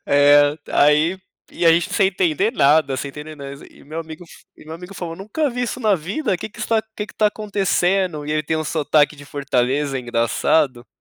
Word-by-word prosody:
É, 145 Hz, +1 st, +5 dB
aí, 150 Hz, +5 st, +3 dB, 0.3 s
e 170 Hz, -, -1 dB
a 165 Hz, -, +8 dB
gente 170 Hz, +1 st, 0 dB
sem 195 Hz, -2 st, +3 dB
entender 190 Hz, -, 0 dB
nada, 140 Hz, -, +3 dB
sem 140 Hz, -, -4 dB
entender 150 Hz, +2 st, -9 dB
nada 140 Hz, 0 st, -9 dB
e -, -, -19 dB
meu 155 Hz, +3 st, -6 dB
amigo 160 Hz, +1 st, -10 dB, 0.3 s
e -, -, -16 dB
meu 160 Hz, +1 st, -8 dB
amigo 180 Hz, +3 st, -10 dB
falou: 165 Hz, -2 st, -6 dB
"Nunca 240 Hz, +10 st, -2 dB
vi 245 Hz, +1 st, -3 dB
isso 250 Hz, +1 st, -3 dB
na 215 Hz, -3 st, +3 dB
vida, 190 Hz, -, -2 dB
que -, -, -7 dB
que -, -, -18 dB
está 225 Hz, -1 st, +1 dB
que 210 Hz, -, -4 dB
que -, -, -15 dB
tá 215 Hz, -, +2 dB
acontecendo?". 190 Hz, -5 st, 0 dB
E -, -, -4 dB
ele 155 Hz, 0 st, 0 dB
tem 160 Hz, +2 st, -2 dB
um 155 Hz, -, -2 dB
sotaque 150 Hz, -1 st, +1 dB
de 145 Hz, -, -12 dB
Fortaleza 135 Hz, 0 st, -1 dB
engraçado. 120 Hz, +2 st, 0 dB
160 Hz, 205 wpm, -20 LUFS, 145-195 Hz, 0.3 s, a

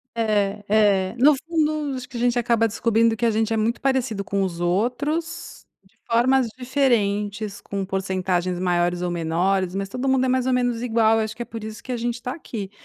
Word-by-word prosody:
É, 210 Hz, -2 st, 0 dB
é 200 Hz, -2 st, +3 dB
no 285 Hz, +4 st, +6 dB
fundo, 305 Hz, -2 st, -1 dB
acho 255 Hz, -1 st, -7 dB
que 245 Hz, -, -7 dB
a -, -, -4 dB
gente 245 Hz, 0 st, +2 dB
acaba 230 Hz, -1 st, +2 dB
descobrindo 225 Hz, +1 st, +2 dB
que 235 Hz, -, -1 dB
a 230 Hz, -, +3 dB
gente 220 Hz, +1 st, 0 dB
é 225 Hz, -, 0 dB
muito 225 Hz, +2 st, 0 dB
parecido 255 Hz, -6 st, 0 dB
com 200 Hz, +1 st, -1 dB
os 170 Hz, -2 st, -3 dB
outros, 250 Hz, -, -2 dB, 0.2 s
de 210 Hz, +4 st, -29 dB, 0.2 s
formas 255 Hz, +2 st, +3 dB
diferentes, 210 Hz, -6 st, 0 dB
com 195 Hz, -1 st, -4 dB
porcentagens 185 Hz, -2 st, -1 dB
maiores 175 Hz, -1 st, +1 dB
ou 180 Hz, -1 st, -1 dB
menores, 175 Hz, +3 st, 0 dB
mas 195 Hz, 0 st, -2 dB
todo 255 Hz, +6 st, -2 dB
mundo 260 Hz, -1 st, +3 dB
é -, -, +1 dB
mais 255 Hz, 0 st, +1 dB
ou 260 Hz, -, +2 dB
menos 245 Hz, -2 st, 0 dB
igual, 225 Hz, -2 st, +3 dB
acho 220 Hz, 0 st, -2 dB
que 240 Hz, -, -4 dB
é -, -, -13 dB
por 225 Hz, -2 st, -8 dB
isso 220 Hz, 0 st, -8 dB
que 260 Hz, -, -6 dB
a 245 Hz, -, -1 dB
gente 240 Hz, +1 st, -3 dB
tá 250 Hz, 0 st, -4 dB
aqui. 210 Hz, -, -7 dB
225 Hz, 210 wpm, -23 LUFS, 195-250 Hz, 0.2 s, no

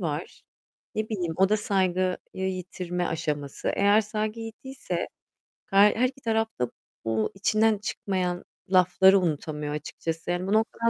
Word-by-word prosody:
var. 160 Hz, -2 st, -4 dB, 0.5 s
Ne 215 Hz, 0 st, -1 dB
bileyim, 175 Hz, -7 st, -2 dB
o 190 Hz, +1 st, +4 dB
da 215 Hz, -, +3 dB
saygıyı 185 Hz, -3 st, +1 dB, 0.2 s
yitirme 180 Hz, -1 st, -3 dB
aşaması. 150 Hz, -3 st, -3 dB
Eğer 205 Hz, +2 st, +4 dB
saygı 215 Hz, +1 st, -3 dB
gittiyse 260 Hz, +4 st, -5 dB, 0.6 s
her 200 Hz, +1 st, +5 dB
her 250 Hz, +3 st, +3 dB
iki 270 Hz, 0 st, -16 dB
taraf 225 Hz, -1 st, +1 dB
da 125 Hz, -, 0 dB, 0.4 s
bu 110 Hz, -1 st, 0 dB
içinden 215 Hz, +2 st, +3 dB
çıkmayan 185 Hz, -3 st, -2 dB, 0.2 s
lafları 190 Hz, +1 st, +6 dB
unutamıyor 150 Hz, -3 st, -2 dB
açıkçası. 165 Hz, +3 st, -4 dB
Yani 180 Hz, +1 st, -1 dB
bu 200 Hz, -, +1 dB
noktadan 225 Hz, +1 st, +2 dB
190 Hz, 140 wpm, -27 LUFS, 170-215 Hz, 0.6 s, lafları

